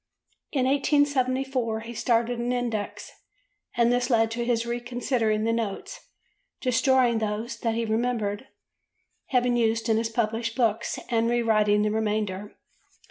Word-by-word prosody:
In 265 -3 +1
1874 265 -4 +1
he 230 +1 -8
started 235 +1 +1
an 240 +1 -1
index, 235 -4 -3 0.7
and 235 0 +4
this 245 0 0
led 225 -2 +3
to 235 +1 -2
his 235 -1 0
reconsidering 240 -2 -1
the 230 +1 +1
notes, 230 - -4 0.5
destroying 255 -2 +3
those 220 +2 -3
that 230 -1 -1
he 230 0 -1
remembered 225 0 -1 0.8
having 250 -1 +2
used 225 -1 +1
in 220 - +3
his 225 0 0
published 225 0 -1
books 230 -2 0
and 230 -1 +1
re 240 0 +1
writing 210 -2 +3
the 210 - +1
remainder. 210 -2 -2
230 Hz, 135 wpm, -26 LUFS, 220-245 Hz, 0.8 s, and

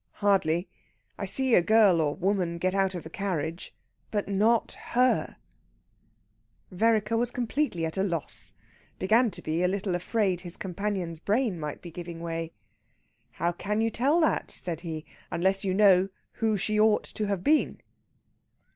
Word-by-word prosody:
Hardly! 185 -4 +1 0.5
I - - -2
see 265 -2 +2
a - - +7
girl 205 -3 +5
or 150 -1 0
woman 185 -2 0
get 185 +2 0
out 195 -1 +1
of 175 - -5
the 160 - -9
carriage, 170 -4 -3 0.4
but 205 -2 -2
not 215 +4 +2
her...!" 250 +1 0 1.3
Vereker 220 +3 +2
was 240 +1 +1
completely 245 - -1
at 160 +3 -4
a - - +2
loss 170 -6 -4 0.4
began 225 +5 +3
to 175 -2 -9
be 160 +2 -1
a 180 - +3
little 195 0 -1
afraid 185 0 0
his 175 -2 -6
companion's 185 -3 -3
brain 210 0 0
might 150 -2 -5
be 170 - -8
giving 170 0 -7
way. 165 -1 -4 0.8
"How 170 - 0
can 205 +5 -2
you 225 0 +1
tell 280 +9 +2
that," 315 - +1
said 165 -3 -5
he, 160 -3 -5 0.2
"unless 190 +3 +1
you 190 - 0
know 195 -2 +5 0.2
who 220 -2 0
she 215 +3 0
ought 215 0 +4
to 215 - -3
have 200 -3 -2
been?" 305 +1 +2
195 Hz, 160 wpm, -28 LUFS, 170-215 Hz, 1.3 s, a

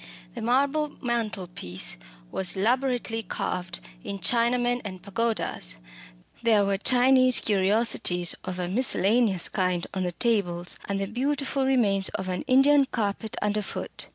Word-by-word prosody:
The - - -7
marble 280 +5 +1
mantelpiece 195 - -3 0.4
was 190 +1 -1
elaborately 245 +1 0
carved 180 -4 -4 0.2
in 200 - -5
Chinamen 245 +5 +2
and 190 -3 -7
pagodas. 200 - -2 0.7
There 220 -4 +3
were 195 -1 0
Chinese 255 +1 +4
curiosities 195 -3 +2
of 185 -1 -5
a 180 -1 -2
miscellaneous 210 -2 +3
kind 180 -2 -1
on 190 - -2
the 180 -1 -1
tables, 180 -6 0
and 200 -1 -2
the 195 - -1
beautiful 270 +4 -1
remains 205 -7 +2
of 190 0 -4
an 180 -1 -2
Indian 275 +2 +5
carpet 220 -3 -3
underfoot. 210 -1 -3
215 Hz, 125 wpm, -26 LUFS, 190-245 Hz, 0.7 s, Indian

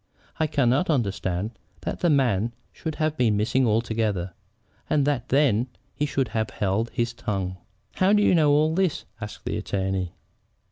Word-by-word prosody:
I 160 - +2
cannot 140 +3 +2
understand 100 - 0 0.3
that - - -4
the 175 - +2
man 120 -6 +2 0.2
should 160 -2 -5
have 155 0 0
been 115 -6 +3
missing 120 +4 +2
altogether, 110 -5 0 0.6
and 145 -2 +3
that 140 -4 -1
then 130 -4 +3 0.3
he 150 - -1
should 135 -3 0
have 110 -1 -1
held 105 +4 -1
his 115 -1 -1
tongue." 95 -6 -3 0.4
"How 185 +1 +4
do 210 0 +5
you - - +4
know 155 -4 +4
all 155 +2 +4
this?" 185 -2 0 0.2
asked 105 0 -7
the - - -1
attorney. 95 -2 -2
120 Hz, 160 wpm, -25 LUFS, 105-145 Hz, 0.6 s, do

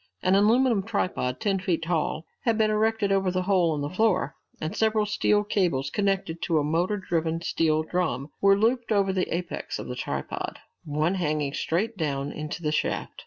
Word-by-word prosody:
An 185 - +3
aluminum 225 +2 +4
tripod, 185 - -2
ten 195 -3 0
feet 175 -3 -1
tall, 165 -1 -1 0.2
had 230 -2 +1
been 215 -1 +3
erected 215 -1 +1
over 195 -1 +2
the 185 0 -1
hole 180 -4 +2
in 145 - -3
the 145 - -2
floor, 210 -9 +2 0.3
and 155 - -4
several 220 -1 +2
steel 210 0 +2
cables, 175 -10 0
connected 195 -5 -1
to 165 - +1
a 150 - +2
motor 170 +7 0
driven 165 -3 -1
steel 155 -2 +1
drum, 160 -5 -2
were 195 0 +5
looped 230 +3 +1
over 200 -2 +2
the 185 -1 -1
apex 175 +1 -3
of - - -6
the - - -5
tripod, - - -4 0.3
one 155 +3 0
hanging 150 -6 -1
straight 205 +10 -1
down 140 -4 -2
into 155 +2 -6
the 150 - +1
shaft. 155 - -2
185 Hz, 185 wpm, -26 LUFS, 155-210 Hz, 0.3 s, were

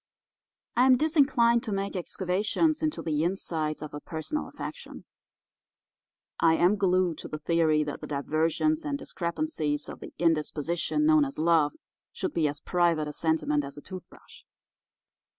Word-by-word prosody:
I 250 +2 +5
am 255 -1 +6
disinclined 265 -6 +3
to 220 - -5
make 195 0 -2
excavations 200 - 0
into 310 -1 -1
the 155 -1 0
insides 160 -4 -2
of 150 - -8
a 145 - -5
personal 165 - -4
affection. - - -8 1.3
I 165 -1 +5
am 180 +5 +4
glued 185 -4 +1
to - - -7
the 155 - -5
theory 155 -1 +2
that 150 -1 -6
the - - -6
diversions 160 - 0
and 290 -2 -2
discrepancies 170 - -2
of - - -8
the - - -9
indisposition 165 - 0
known 310 -1 +5
as 275 -1 -4
love 160 -3 +3 0.4
should - - -4
be 160 -3 +2
as 145 0 -4
private 170 -4 +1
a 150 - -5
sentiment 160 -2 +1
as 140 +1 -8
a - - -8
toothbrush. 185 +2 -12
170 Hz, 150 wpm, -28 LUFS, 155-235 Hz, 1.3 s, am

